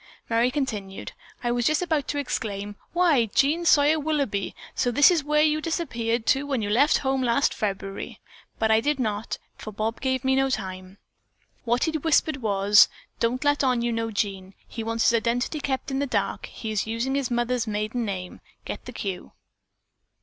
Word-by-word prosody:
Merry 230 +2 +3
continued: 220 -9 -4 0.3
"I 240 - +1
was 240 -1 +1
just 310 +3 +2
about 315 -5 0
to 290 - -2
exclaim, 205 -7 -3 0.2
'Why, 330 -10 +3
Jean 295 +10 +1
Sawyer 305 0 +5
Willoughby, 280 -10 -1 0.2
so 245 - 0
this 285 +8 +6
is 330 -4 +1
where 300 +1 +3
you 310 0 +2
disappeared 240 -9 -2
to 275 +2 +2
when 265 -6 -1
you 205 - -2
left 285 +8 +4
home 265 0 +1
last 245 +2 +2
February!' 195 -1 -4 0.4
but 220 0 +1
I 220 - +5
did 290 +2 0
not, 215 -3 -2 0.2
for 215 - -7
Bob 215 +2 -3
gave 260 -1 0
me 265 0 +3
no 270 0 +2
time. 190 -4 -5 0.7
What 240 +2 +1
he 320 - +1
whispered 315 -1 +1
was, 205 -3 +5 0.3
'Don't 245 +4 0
let 290 0 +2
on 250 -3 +2
you 240 - 0
know 225 0 -1
Jean. 195 -3 -3
He 225 - -6
wants 230 0 0
his 235 - +4
identity 245 +6 -1
kept 270 -1 -3
in 270 - -1
the 285 - 0
dark. - - -2
He 220 - -6
is 215 0 -1
using 230 +4 -1
his 275 -2 -1
mother's 240 -1 0
maiden 215 +3 -2
name. 185 -4 -5 0.2
Get - - -6
the - - -8
cue?' 190 -3 -5
240 Hz, 185 wpm, -25 LUFS, 215-285 Hz, 0.7 s, this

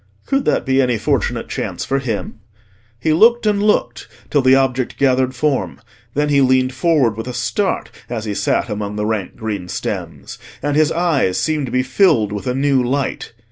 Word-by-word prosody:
Could 275 0 0
that - - +1
be 135 0 +3
any 125 -3 +1
fortunate - - -1
chance - - -4
for 135 - 0
him? 115 -4 -4 0.6
He 155 +6 +1
looked 230 +7 +4
and 205 -1 +2
looked 210 0 0 0.2
till 145 - +3
the 130 0 +5
object 130 -2 0
gathered 130 -1 +2
form: 145 0 -1 0.4
then 150 +1 +1
he 140 -1 +4
leaned 130 0 +3
forward 140 -7 +2
with 115 +3 -6
a 125 - -5
start 125 - -1 0.2
as 115 -2 -4
he 105 - -2
sat - - 0
among 105 -2 -4
the 105 0 -2
rank 105 -4 -2
green 105 -6 -4
stems, - - -5 0.2
and 145 0 -1
his 155 +1 +3
eyes 160 - +1
seemed 155 -4 -1
to - - -6
be 125 0 +1
filled 130 - +2
with 105 +4 -5
a 125 - 0
new 135 -1 +2
light. 135 -1 -2
130 Hz, 190 wpm, -18 LUFS, 115-150 Hz, 0.6 s, the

